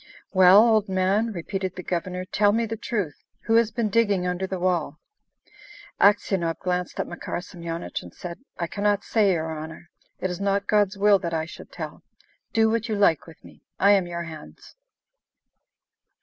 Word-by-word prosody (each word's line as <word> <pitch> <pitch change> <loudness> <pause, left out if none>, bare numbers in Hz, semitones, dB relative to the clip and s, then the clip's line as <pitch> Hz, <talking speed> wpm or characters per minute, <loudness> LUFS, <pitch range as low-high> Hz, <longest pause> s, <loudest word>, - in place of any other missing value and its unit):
"Well, 190 +4 +7
old 215 -3 +2
man," 190 +4 +1
repeated 190 0 -4
the 180 - -7
Governor, 180 +1 -3
"tell 205 +2 +2
me 230 +1 +1
the 225 0 -4
truth: 205 - -3 0.2
who 225 - -1
has 230 -2 +3
been 225 -1 -1
digging 205 -5 +2
under 180 +1 -2
the 190 - -3
wall?" 175 -5 -1 1.0
Aksionov 195 -5 +3
glanced 180 -1 -3
at - - 0
Makar - - -5
Semyonich, 170 - -6
and 90 - -12
said, 170 - -8 0.2
"I 170 - -1
cannot 205 +3 0
say, 210 -4 +2
your 160 -1 -2
honour. 160 +2 -9 0.3
It 185 - -2
is 180 - -6
not 200 0 +1
God's 205 -2 +2
will 200 0 +5
that 170 -2 -3
I 160 0 -1
should 170 - -12
tell! - - -7 0.5
Do 225 -1 +3
what 230 +1 -1
you 215 - 0
like 200 -7 +2
with 165 - -15
me; - - -16 0.2
I 200 - +6
am 195 -3 +4
in - - -9
your 170 0 -4
hands." 160 -2 -11
190 Hz, 180 wpm, -25 LUFS, 170-205 Hz, 1.0 s, Well